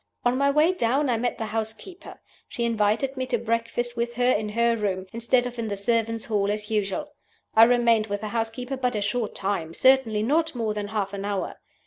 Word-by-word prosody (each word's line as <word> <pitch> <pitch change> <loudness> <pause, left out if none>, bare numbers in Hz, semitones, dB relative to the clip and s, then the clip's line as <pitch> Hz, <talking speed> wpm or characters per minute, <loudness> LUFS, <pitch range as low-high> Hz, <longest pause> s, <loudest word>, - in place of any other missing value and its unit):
On 245 +1 +3
my 280 +2 +2
way 300 +5 +4
down 265 -1 +1
I 235 - +1
met 245 +2 -1
the 225 - -3
housekeeper. 225 - -6 0.3
She 235 - -4
invited 230 +4 +1
me 260 -1 -3
to 250 -2 +1
breakfast 230 +1 -2
with 235 0 -2
her 245 +1 +3
in 215 -3 0
her 235 +2 +2
room, 195 -4 -2
instead 235 +2 +1
of 245 -1 -6
in 225 - -2
the 200 -1 -3
servants' 225 +2 0
hall 205 -2 0
as 210 +1 -3
usual. 210 +8 -1 0.4
I 225 +1 +9
remained 235 -2 +3
with 205 -1 -3
the 215 - -4
housekeeper 235 +4 -3
but 250 -2 -1
a 210 - -1
short 210 +2 -2
time 180 -5 -2
certainly 260 -5 +4
not 320 +5 +1
more 225 -3 -1
than 210 -1 -4
half 205 -2 -2
an 200 0 -4
hour. 200 -2 -3
230 Hz, 210 wpm, -25 LUFS, 210-245 Hz, 0.4 s, I